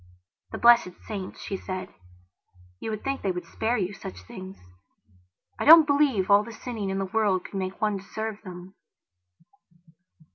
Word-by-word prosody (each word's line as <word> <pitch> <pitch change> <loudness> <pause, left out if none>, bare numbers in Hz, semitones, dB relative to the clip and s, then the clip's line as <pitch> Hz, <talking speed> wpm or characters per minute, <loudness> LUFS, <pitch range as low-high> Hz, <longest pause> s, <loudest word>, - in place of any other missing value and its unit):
"The - - -5
blessed 235 -7 +5
saints," 195 -4 -6
she 195 - -4
said, 185 -1 -6 0.9
"you - - -5
would 215 -1 -5
think 275 0 -2
they 195 - -1
would 180 -1 -5
spare 225 +8 -1
you 195 -1 -2
such 95 - -9
things. 185 - -10 1.0
I - - -1
don't 320 +1 +10
believe 280 -10 +2
all 200 +1 +6
the 230 - -9
sinning 225 -3 -5
in 190 - -2
the 195 - -1
world 200 -2 0
could 195 - -5
make 185 0 -4
one 210 -2 0
deserve 215 +2 -6
them." 180 -1 -10
200 Hz, 160 wpm, -26 LUFS, 185-225 Hz, 1.0 s, don't